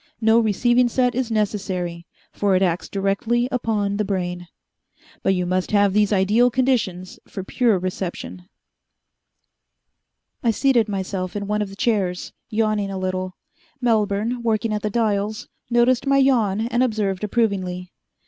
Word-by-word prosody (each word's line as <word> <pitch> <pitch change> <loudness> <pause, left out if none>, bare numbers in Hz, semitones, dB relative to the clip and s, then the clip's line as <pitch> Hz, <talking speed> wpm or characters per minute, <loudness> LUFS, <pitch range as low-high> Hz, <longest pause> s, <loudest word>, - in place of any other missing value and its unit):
No 225 0 +4
receiving 240 +3 +3
set 250 +1 +1
is 250 -1 -1
necessary, 190 -5 -2 0.3
for 200 -2 +1
it 185 - +3
acts 175 -1 -1
directly 200 +5 0
upon 210 -5 -1
the 210 - +1
brain. 180 -3 -3 0.7
But 195 - +2
you 180 -1 -1
must 185 +1 -1
have 205 -2 +3
these 210 0 +3
ideal 210 +5 +4
conditions 225 -8 -1
for 190 - -6
pure 225 +1 +2
reception." 175 - -5 1.9
I 235 - +1
seated 235 -1 +2
myself 190 -1 -3
in 200 -1 -3
one 210 +1 -1
of 205 - -2
the 195 - -10
chairs, 200 -6 -1 0.2
yawning 215 -2 0
a 195 - -4
little. 185 0 -3 0.4
Melbourne, 225 0 0
working 225 -1 0
at 210 - -2
the 210 - -1
dials, 210 -1 -1 0.2
noticed 240 +2 +3
my 275 0 +4
yawn 230 -7 +3
and 240 +2 0
observed 210 -6 0
approvingly. 190 -5 -1
210 Hz, 145 wpm, -22 LUFS, 190-230 Hz, 1.9 s, No